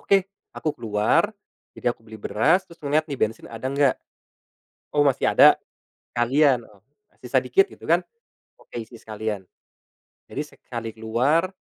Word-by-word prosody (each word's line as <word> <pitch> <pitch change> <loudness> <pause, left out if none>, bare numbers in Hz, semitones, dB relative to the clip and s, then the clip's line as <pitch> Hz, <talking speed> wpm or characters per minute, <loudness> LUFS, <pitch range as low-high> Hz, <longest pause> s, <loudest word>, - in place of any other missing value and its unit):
Oke, 195 -2 +3 0.3
aku 155 - -1
keluar, 115 - +2 0.5
jadi 120 - 0
aku - - -29
beli 110 -1 -11
beras 160 - +2
terus 170 - -17
ngeliat 150 +2 +1
nih 140 -3 -4
bensin 110 -1 -1
ada 115 +2 -6
nggak? 140 -1 +3 1.0
Oh, 145 0 +4
masih 140 -3 +2
ada, - - +8 0.6
sekalian, 130 +3 +3 0.6
sisa - - +2
sedikit 390 +1 +3
gitu - - -14
kan. - - +5 0.6
Oke, 120 - -7
isi 115 +2 -13
sekalian. 110 -2 -4 0.9
Jadi - - -2
sekali 115 -2 -6
keluar 125 +11 +1
125 Hz, 140 wpm, -24 LUFS, 110-155 Hz, 1.0 s, ada